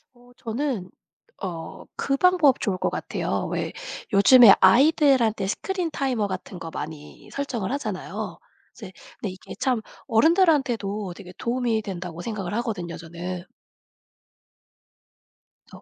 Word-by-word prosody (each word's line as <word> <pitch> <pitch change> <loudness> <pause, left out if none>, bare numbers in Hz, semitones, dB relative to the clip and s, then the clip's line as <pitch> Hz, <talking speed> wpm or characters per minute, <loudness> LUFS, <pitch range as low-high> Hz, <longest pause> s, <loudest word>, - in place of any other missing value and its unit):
어 245 0 -20
저는 230 -5 -3 0.5
어 170 -5 -6
그 275 0 0
방법 345 -6 +4
좋을 195 -4 0
것 - - 0
같아요. - - -2
왜 - - -2 0.4
요즘에 215 +2 +9
아이들한테 240 -1 +4
스크린 360 - -2
타이머 255 -8 0
같은 185 -1 -6
거 165 - -6
많이 150 -1 -8
설정을 250 -7 -3
하잖아요. 280 +1 -4 0.4
이제 - - -10 0.3
근데 205 - -3
이게 185 - -10
참 250 -4 +1 0.3
어른들한테도 235 - +2
되게 180 -1 -11
도움이 235 -2 0
된다고 175 -4 -6
생각을 195 -3 -4
하거든요 205 -8 -3
저는. 175 +2 -6 2.3
어. - - -12
그래서 - - -25
220 Hz, 280 characters per minute, -24 LUFS, 185-265 Hz, 2.3 s, 요즘에